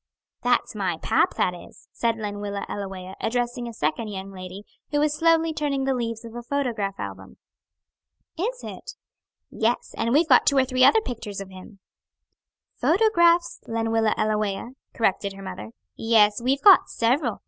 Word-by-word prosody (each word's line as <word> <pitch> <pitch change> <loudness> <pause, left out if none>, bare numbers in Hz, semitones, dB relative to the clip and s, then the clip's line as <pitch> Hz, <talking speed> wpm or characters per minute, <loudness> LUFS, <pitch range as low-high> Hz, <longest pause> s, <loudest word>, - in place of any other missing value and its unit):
"That's 245 0 +1
my 190 -6 -2
pap, - - +1
that 180 - +1
is," 175 - -14
said 230 -1 0
Lenwilla 205 -1 -4
Ellawea, 190 -2 -6
addressing 240 +1 -2
a - - -6
second 155 +8 -1
young 195 -1 -6
lady, 185 +1 -9 0.3
who 295 - 0
was 300 0 +2
slowly 330 0 +3
turning 285 -3 -1
the 270 0 +1
leaves 230 -2 -4
of 230 - -10
a 240 - -6
photograph 235 -7 -2
album. - - -8 1.0
"Is 475 +9 -3
it?" 475 - -8 0.6
"Yes, 230 +2 -1
and 230 +1 -1
we've 310 +5 +4
got 255 -5 +5
two 280 - +4
or 265 - +4
three 255 0 +1
other 445 +11 +6
picters 220 - -6
of 195 -1 -8
him." 190 +1 -13 1.0
"Photographs, 345 -3 +3
Lenwilla 225 -1 0
Ellawea," 215 0 -1 0.3
corrected 200 -3 0
her 195 0 -11
mother. 110 - -7 0.3
"Yes, 215 -2 +3
we've 265 +3 0
got 395 -3 +7
several. 240 0 0
230 Hz, 160 wpm, -24 LUFS, 200-275 Hz, 1.0 s, got